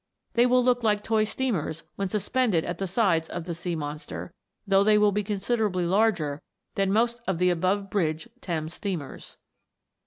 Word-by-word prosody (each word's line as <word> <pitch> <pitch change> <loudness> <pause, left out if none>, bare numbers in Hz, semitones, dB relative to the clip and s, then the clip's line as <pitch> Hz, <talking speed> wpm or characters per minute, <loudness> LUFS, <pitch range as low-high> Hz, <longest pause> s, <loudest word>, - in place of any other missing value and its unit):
They 240 +1 +4
will 250 0 +4
look 245 0 +3
like 210 -2 +1
toy 220 -1 +2
steamers 190 - -2
when 195 -1 -2
sus 205 0 -2
pended 230 -11 +2
at 175 - -4
the 195 - -1
sides 175 -5 +1
of 175 - -4
the 170 0 -4
sea 170 +1 -3
monster, 150 +3 -6 0.3
though 195 -1 +4
they 210 0 +5
will 210 -1 +4
be 205 +1 0
considerably 200 -2 0
larger 175 -7 +1 0.3
than 195 -1 +1
most 235 +3 +1
of 190 -3 0
the 180 +1 +3
above 190 +3 0
bridge 160 -2 0
Thames 160 -2 -3
steamers. 175 -9 -6
195 Hz, 180 wpm, -26 LUFS, 170-215 Hz, 0.3 s, they